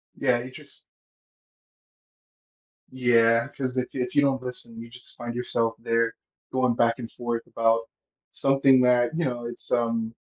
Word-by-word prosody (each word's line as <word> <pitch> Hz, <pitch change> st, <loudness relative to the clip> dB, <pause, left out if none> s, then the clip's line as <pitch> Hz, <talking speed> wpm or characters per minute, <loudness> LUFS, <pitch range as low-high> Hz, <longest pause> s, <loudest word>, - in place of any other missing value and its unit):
Yeah, 125 Hz, -3 st, +1 dB
you 130 Hz, -, -9 dB
just -, -, -15 dB, 2.1 s
Yeah, 115 Hz, -2 st, +3 dB
'cause 130 Hz, -1 st, -3 dB
if 125 Hz, -, -2 dB
you 130 Hz, -, -3 dB
if 125 Hz, -, -7 dB
you 145 Hz, -, +6 dB
don't 135 Hz, -2 st, +1 dB
listen, 120 Hz, -2 st, -8 dB
you 115 Hz, 0 st, -9 dB
just 125 Hz, +1 st, -16 dB
find 120 Hz, 0 st, -6 dB
yourself 115 Hz, -2 st, -1 dB
there 115 Hz, 0 st, 0 dB, 0.4 s
going 130 Hz, -2 st, +2 dB
back 115 Hz, +1 st, +1 dB
and 115 Hz, -1 st, -7 dB
forth 120 Hz, -1 st, -4 dB
about 115 Hz, 0 st, +2 dB, 0.5 s
something 135 Hz, -1 st, +4 dB
that 125 Hz, +2 st, +3 dB
you 170 Hz, -, 0 dB
know, 120 Hz, -2 st, -3 dB
it's 120 Hz, 0 st, -9 dB
um, 115 Hz, -1 st, 0 dB
120 Hz, 160 wpm, -25 LUFS, 115-130 Hz, 2.1 s, you